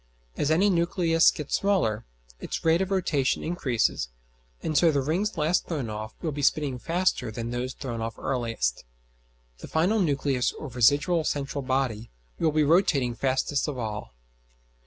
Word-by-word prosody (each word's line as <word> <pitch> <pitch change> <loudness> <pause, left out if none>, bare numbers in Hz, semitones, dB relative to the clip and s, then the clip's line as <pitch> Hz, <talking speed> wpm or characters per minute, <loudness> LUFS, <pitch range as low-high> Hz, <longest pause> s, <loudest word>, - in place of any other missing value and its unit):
As 145 - 0
any 190 +6 +4
nucleus 170 -1 +3
gets 150 -3 -2
smaller, 185 - +1 0.3
its - - -5
rate 165 +2 +4
of 190 - -1
rotation 160 -8 0
increases, 130 - 0 0.5
and 155 - -2
so 165 +2 +5
the 145 - +1
rings 180 +8 -1
last 160 +3 +1
thrown 140 -10 -3
off 110 0 -6
will 160 - -1
be 145 0 -4
spinning 140 -2 +1
faster 165 -6 0
than 115 +1 -5
those 125 +1 -3
thrown 120 -4 -5
off 115 0 -4
earliest. 115 - -2 0.8
The - - -9
final 180 +8 +2
nucleus 140 -6 +1
or 155 - -7
residual 145 +7 +3
central 140 -1 -2
body 130 -4 -1 0.3
will 160 -2 +2
be 155 0 +2
rotating 145 -6 +3
fastest 135 +4 0
of 145 -3 -4
all. 105 - -5
145 Hz, 155 wpm, -26 LUFS, 120-165 Hz, 0.8 s, so